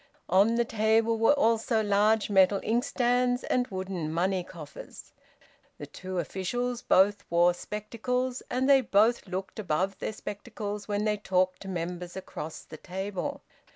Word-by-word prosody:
On 200 +6 +4
the 235 0 +2
table 225 +1 +2
were 225 +6 +5
also 230 -4 +2
large 210 +1 +3
metal 195 0 +5
inkstands 245 +1 +1
and 250 0 +1
wooden 185 -6 -4
money 180 +3 0
coffers. 170 -5 -11 0.6
The 145 - -7
two 185 +5 -7
officials 240 +8 -2
both 200 +2 +3
wore 175 +1 +4
spectacles, 240 +6 -3
and 260 +1 0
they 275 -1 +6
both 225 0 +2
looked 190 +3 -5
above 190 +1 -1
their - - -3
spectacles 205 -1 -6
when 205 0 -1
they 210 -1 +1
talked 185 -2 0
to 195 - -8
members 175 0 -5
across 160 -4 -7
the 155 - -11
table. 190 - -5
205 Hz, 145 wpm, -28 LUFS, 185-230 Hz, 0.6 s, they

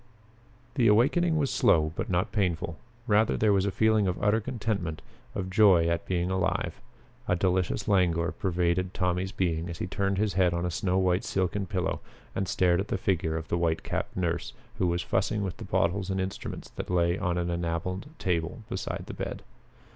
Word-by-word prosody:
The 125 -4 +3
awakening 155 +10 +4
was 140 -3 +1
slow, 80 -1 +3
but - - -3
not 90 -1 0
painful. 85 -5 -1 0.3
Rather 110 -1 +3
there 105 -2 +3
was 100 0 +2
a - - 0
feeling 110 0 +3
of 90 - -1
utter 105 +2 +2
contentment, 105 -9 -2 0.4
of 95 -1 -3
joy 95 -5 +5
at 85 0 -1
being 90 0 0
alive. 95 0 -1 0.5
A 90 - +3
delicious 95 +2 0
languor 85 -4 +2
pervaded 90 0 0
Tommy's 90 0 0
being 85 -5 -1
as 85 - -5
he - - -3
turned 100 +1 -1
his 105 -1 +1
head 90 -1 +3
on 85 +1 -1
a 90 - -1
snow 90 +2 0
white 90 0 +2
silken 95 +1 -1
pillow 90 0 -1 0.3
and 95 0 -2
stared 90 -1 +2
at 100 - -2
the - - -1
figure 80 -4 0
of 80 - -6
the 85 - 0
white 80 -1 0
capped - - -3
nurse 85 -2 -1 0.3
who 90 - +2
was 85 0 0
fussing 105 -1 0
with 95 -3 -4
the - - -7
bottles 90 +3 0
and 95 0 -1
instruments 95 0 -5
that - - -4
lay 85 0 +2
on 90 -4 0
an 85 0 -1
enameled 85 - -2
table 90 - -2
beside - - -4
the - - -7
bed. - - -5
90 Hz, 190 wpm, -28 LUFS, 85-100 Hz, 0.5 s, joy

